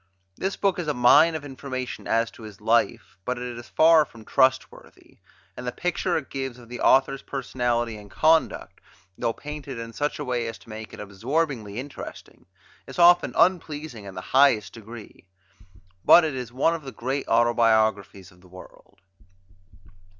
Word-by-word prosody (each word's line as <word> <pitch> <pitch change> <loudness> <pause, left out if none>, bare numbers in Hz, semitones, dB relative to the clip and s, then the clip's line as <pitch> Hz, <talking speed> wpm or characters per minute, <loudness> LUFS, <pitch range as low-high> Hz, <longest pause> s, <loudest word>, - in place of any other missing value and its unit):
This 190 - -3
book 195 -3 0
is 170 - -4
a 150 - -1
mine 145 +7 +5
of 150 -2 -5
information 130 -2 -6
as 115 0 +1
to - - -16
his 105 -3 -11
life, 115 -2 0
but 125 +4 -3
it 125 0 -6
is 120 0 -11
far 160 0 +5
from 115 -6 -15
trustworthy; 130 0 -1 0.4
and 125 - -7
the - - -1
picture 175 +6 -1
it 155 - -7
gives 135 -2 -4
of 120 -2 -15
the 125 - -7
author's 135 +1 +3
personality 120 -4 -2
and 105 -1 -13
conduct, 160 +8 +1 0.3
though 115 - -1
painted 145 0 -8
in 115 0 -7
such 145 +5 -2
a 145 - -5
way 120 -2 -2
as 115 - -6
to - - -19
make 110 -1 -8
it - - -11
absorbingly 110 +2 -3
interesting, 135 +3 -9 0.4
is - - -10
often 175 0 +5
unpleasing 155 - 0
in 95 -1 -9
the 90 - -5
highest 130 -7 +4
degree. 110 -3 -12 0.8
But 175 - +8
it 155 -2 -1
is 125 -3 -6
one 135 +7 +1
of 165 - -4
the 135 -2 -8
great 130 +4 -4
autobiographies 110 -4 +2
of 90 0 -22
the 90 - -19
world. 90 0 -16
125 Hz, 170 wpm, -25 LUFS, 115-145 Hz, 0.8 s, But